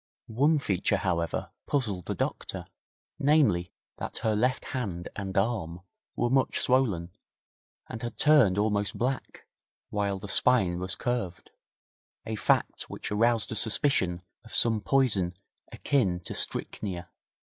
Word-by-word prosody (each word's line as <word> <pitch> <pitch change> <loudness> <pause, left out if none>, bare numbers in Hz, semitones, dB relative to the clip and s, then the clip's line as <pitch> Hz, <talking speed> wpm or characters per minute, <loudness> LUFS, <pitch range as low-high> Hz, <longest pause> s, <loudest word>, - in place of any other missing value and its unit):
One 145 +8 +2
feature, 100 -6 +1
however, 85 -3 -1 0.2
puzzled 105 - -1
the - - -2
doctor - - -3 0.5
namely, 135 - +3 0.3
that - - -5
her 110 -1 +2
left 125 +5 +1
hand 95 -10 -3
and 95 -1 -4
arm 95 -5 -1 0.3
were 120 0 0
much 135 0 +2
swollen, 105 -10 +1 0.8
and 110 - -7
had 120 -2 -5
turned 145 -11 +5
almost 105 -1 0
black, 130 +2 -3 0.5
while 100 -1 0
the 100 +2 -8
spine 95 -6 +3
was 95 0 -2
curved 120 -9 -3 0.7
a 110 0 -3
fact - - 0
which - - -6
aroused 115 +1 +2
a - - -2
suspicion 100 -6 +2 0.2
of 115 - -6
some 115 -2 +3
poison 100 -9 +2 0.3
akin 100 -12 +1
to - - -5
strychnia. 90 -4 -3
105 Hz, 130 wpm, -28 LUFS, 90-125 Hz, 0.8 s, turned